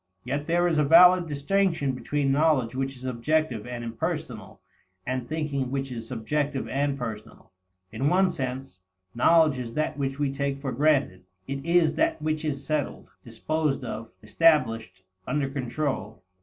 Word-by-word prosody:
Yet 145 +2 -3
there 175 +1 +2
is 160 -3 +1
a - - +4
valid 175 +3 +7
distinction 155 0 0
between 135 +2 -1
knowledge 140 -5 +2
which 135 +1 -3
is 130 0 -10
objective 130 -1 -1
and 120 -1 -5
impersonal, 115 -1 -5 0.5
and 130 -1 -3
thinking 150 -4 -2
which 135 0 -3
is 115 -2 -6
subjective 135 +4 -2
and 140 0 -1
personal. 110 -8 -8 0.4
In 140 +2 0
one 185 +1 +3
sense, 130 - -5 0.3
knowledge 155 +2 +4
is 115 -2 -6
that 155 -1 -1
which 135 -1 -2
we 145 -2 -1
take 140 0 -2
for 135 -2 -3
granted. 135 -9 +1 0.2
It 135 0 -4
is 170 -1 +3
that 325 0 +2
which 155 0 -2
is 140 -3 -3
settled, 155 -2 -3
disposed 140 +5 -2
of, 115 -2 -6
established, 115 - +2 0.2
under 145 -2 0
control. 130 -6 -3
140 Hz, 155 wpm, -26 LUFS, 125-155 Hz, 0.5 s, valid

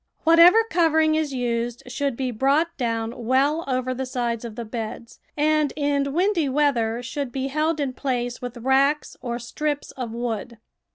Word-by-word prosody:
Whatever 340 +7 +7
covering 320 -5 +3
is 310 -2 0
used 240 -2 -2
sliould 270 +1 -2
be 255 0 -2
brought 280 +8 +1
doAvn 230 -2 -2
well 270 +7 +1
over 255 -1 -1
the 260 +1 -4
sides 240 -2 -2
of 230 -2 -7
the 235 - -5
beds, 225 +1 -6 0.2
and 305 -1 +2
in 285 -1 0
windy 345 -2 +1
weather 245 -5 +1
should 275 0 -4
be 270 +1 -3
held 310 +3 0
in 275 -3 -1
place 245 -2 -3
with 245 0 -6
racks 270 +4 +1
or 240 -2 -3
strips 290 +5 -3
of 250 -3 -6
wood. 235 0 -4
265 Hz, 165 wpm, -24 LUFS, 240-300 Hz, 0.2 s, Whatever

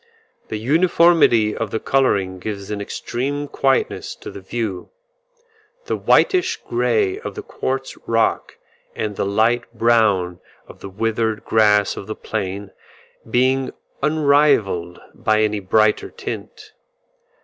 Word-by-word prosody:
The 110 - -4
uniformity 155 -4 +4
of 115 - -3
the 110 - -2
colouring 100 -10 +1
gives 100 +1 -6
an 105 -1 -3
extreme 140 +7 -3
quietness 135 -1 0
to - - -9
the 100 - -10
view, 100 -2 -4 1.0
the - - -1
whitish 370 -1 +2
grey 405 -3 +1
of 460 - -7
the 420 - -6
quartz 135 - -4
rock, 115 -1 0 0.4
and 105 -2 -3
the 100 - -1
light 110 +5 +1
brown 105 -7 +2 0.3
of - - -14
the 100 - -8
withered 110 +2 -1
grass 105 -2 +3
of 100 - -7
the 110 - -4
plain, 100 -2 -4 0.6
being 130 +2 +1 0.3
unrelieved 140 - +2 0.2
by 110 0 +1
any 105 -1 0
brighter 105 +3 +2
tint. 435 -2 -8
110 Hz, 125 wpm, -20 LUFS, 100-135 Hz, 1.0 s, uniformity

